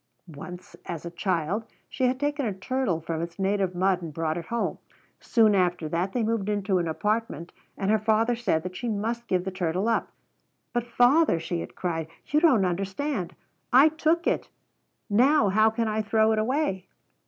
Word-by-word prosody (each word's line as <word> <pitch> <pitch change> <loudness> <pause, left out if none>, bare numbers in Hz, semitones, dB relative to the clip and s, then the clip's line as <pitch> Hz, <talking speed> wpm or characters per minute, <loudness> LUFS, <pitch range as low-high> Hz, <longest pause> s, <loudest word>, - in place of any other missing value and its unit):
Once, 180 +5 -10
as 170 -1 -5
a 170 - -5
child, 180 +3 -1 0.2
she 260 - -1
had 255 +1 +1
taken 290 0 -1
a 225 - 0
turtle 190 -2 -1
from 165 0 -4
its 170 0 -6
native 195 -1 0
mud 185 0 +2
and 160 -4 -7
brought 160 -1 -1
it 170 -1 -6
home. 235 0 -2 0.4
Soon 220 -3 +3
after 175 -4 +1
that 170 +5 -1
they 240 +1 -1
moved 220 -2 -1
into 200 -2 +1
an 170 - -1
apartment 210 0 -2 0.3
and 195 +1 0
her 220 - +3
father 225 +2 +2
said 195 -9 0
that 180 0 -6
she 240 - -3
must 230 +3 -2
give 180 -1 +1
the 190 - -2
turtle 185 +2 -1
up. 230 - 0 0.6
"But, 240 -1 -1
father," 245 - +4
she 170 +1 -3
had - - -7
cried, 165 -3 -2 0.2
"you 300 - +2
don't 265 - +4
understand! 195 - -2 0.4
I 270 +5 +7
took 320 +2 0
it! - - 0 0.6
Now 240 +2 +4
how 215 +3 +4
can 225 +1 -1
I 215 0 0
throw 220 +1 +2
it 220 - +1
away?" 220 - -1
205 Hz, 190 wpm, -26 LUFS, 180-235 Hz, 0.6 s, I